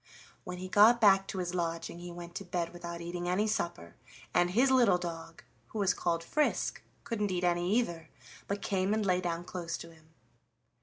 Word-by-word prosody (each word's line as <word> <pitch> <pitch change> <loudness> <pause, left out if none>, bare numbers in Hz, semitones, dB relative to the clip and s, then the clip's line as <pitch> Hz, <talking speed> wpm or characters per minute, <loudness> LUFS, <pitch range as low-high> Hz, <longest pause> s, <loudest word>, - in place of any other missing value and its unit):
When 180 0 -5
he 185 +1 -6
got 215 +5 +6
back 195 -3 +5
to - - -5
his 180 -1 -2
lodging 170 -1 -3
he 175 0 -7
went 170 0 -9
to 200 - -5
bed 175 -2 -3
without 170 -1 -7
eating 175 +1 -4
any 190 +4 +2
supper, 170 - -2 0.4
and 175 0 +3
his 245 +8 +3
little 240 -8 +5
dog, 165 -2 -7 0.2
who - - -8
was 200 -2 +3
called 170 -1 -1
Frisk, 300 - 0 0.2
couldn't 210 -3 -1
eat 180 -1 -1
any 175 +1 +1
either, 170 -9 -2 0.4
but 200 0 -3
came 195 +1 +1
and 215 -1 0
lay 180 -1 +2
down 170 -1 -2
close 175 -2 -4
to 170 - -10
him. 160 -1 -20
180 Hz, 195 wpm, -31 LUFS, 170-200 Hz, 0.4 s, got